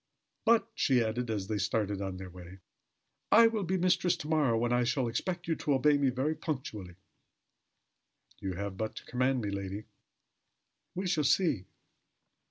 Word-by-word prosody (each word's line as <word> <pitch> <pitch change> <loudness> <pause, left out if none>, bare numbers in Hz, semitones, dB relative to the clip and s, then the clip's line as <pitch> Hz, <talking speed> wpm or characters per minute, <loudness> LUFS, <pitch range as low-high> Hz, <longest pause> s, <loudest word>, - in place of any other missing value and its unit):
But," 230 0 +4
she 130 - +3
added, 115 +2 -2
as 105 -3 -2
they 105 +1 -2
started 105 0 -1
on 95 -1 -4
their 95 -1 -8
way, 90 +1 -11 0.7
"I 230 +2 +8
will 225 -2 +2
be 190 0 0
mistress 180 0 +2
to 150 - -7
morrow, 150 -7 +2
when 120 +1 +1
I 125 0 +3
shall 120 +1 0
expect 175 +9 -3
you 165 - +1
to 145 - +1
obey 145 +3 +4
me 140 -2 +3
very 130 +5 0
punctually." 130 - -5 1.4
"You 95 -1 -3
have 100 +1 -5
but 110 0 -3
to - - -9
command 125 +1 +1
me, 105 -2 -3
lady." 100 +1 -4 1.1
"We 190 +2 -2
shall 175 -4 +1
see." 140 - +2
125 Hz, 170 wpm, -31 LUFS, 100-155 Hz, 1.4 s, I